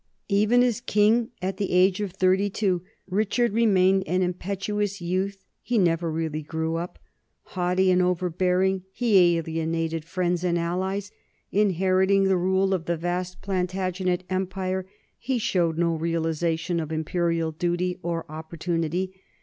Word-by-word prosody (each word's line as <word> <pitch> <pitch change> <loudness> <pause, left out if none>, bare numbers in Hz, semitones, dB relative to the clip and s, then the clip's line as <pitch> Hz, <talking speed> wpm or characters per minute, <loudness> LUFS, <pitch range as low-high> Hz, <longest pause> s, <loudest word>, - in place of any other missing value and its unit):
Even 215 +5 +4
as 240 -2 0
king 225 +2 +3
at 190 0 -2
the 200 -2 -2
age 185 +2 +4
of 200 -3 -2
thirty 190 +2 +2
two, 190 -3 0 0.3
Richard 215 +4 +1
remained 195 -4 +4
an 185 +1 +1
impetuous 200 +3 -2
youth; 190 +3 -2 0.2
he 245 - -1
never 170 -3 +2
really 155 -1 -2
grew 160 +2 -3
up. 175 +2 -5 0.6
Haughty 185 +1 +2
and 180 0 +4
overbear 180 0 +1
ing, 190 0 +1
he 190 -7 +4
alienated 165 0 -2
friends 175 +1 -1
and 175 -1 +1
allies; 190 +4 -2 0.4
inheriting 190 0 +3
the 190 0 +3
rule 190 +2 +2
of 175 -3 -2
the 170 0 -1
vast 180 +2 -3
Plantagenet 185 -1 -1
empire, 185 0 -2 0.3
he 255 +1 -1
showed 175 -7 0
no 170 -1 +2
realization 165 +1 -1
of 160 -1 -4
imperial 165 +1 0
duty 175 +3 -1
or 170 -2 -3
opportunity. 165 +3 -3
185 Hz, 140 wpm, -25 LUFS, 170-195 Hz, 0.6 s, Even